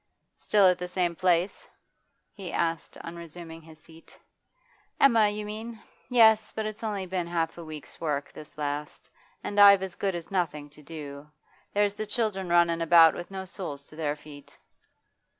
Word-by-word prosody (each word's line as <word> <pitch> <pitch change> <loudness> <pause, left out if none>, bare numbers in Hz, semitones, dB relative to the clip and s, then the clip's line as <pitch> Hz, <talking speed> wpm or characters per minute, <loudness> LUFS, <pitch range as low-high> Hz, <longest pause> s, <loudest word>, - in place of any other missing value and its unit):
'Still 205 -2 +3
at 180 -1 +4
the 180 - -4
same 180 -1 -1
place?' 180 +1 +1 0.7
he 190 -4 -7
asked 165 -3 -2
on 170 - -7
resuming 165 -1 -9
his 160 0 -15
seat. 160 +1 -16 0.8
'Emma, 230 -6 +5
you 210 0 -5
mean? 220 +2 -7 0.3
Yes, 220 -3 +5
but 220 - -4
it's 215 +1 -6
only 205 -3 -2
been 180 -1 -3
half 165 -1 -1
a - - -7
week's 155 -2 -10
work, 145 -3 -2
this 150 - -12
last. 145 -3 -5 0.3
And 205 - -2
I've 200 -1 +8
as 190 -2 -5
good 195 0 -2
as 170 +1 -7
nothing 150 -6 -2
to 150 - -16
do. 145 -1 -9 0.5
There's 205 -1 +2
the 215 +1 -5
children 210 -5 -2
runnin' 170 -1 +3
about 165 -1 +7
with 175 - -7
no 190 -1 -6
soles 160 -7 -7
to - - -14
their 150 -2 -2
feet. 145 -1 -14
175 Hz, 170 wpm, -27 LUFS, 155-200 Hz, 0.8 s, I've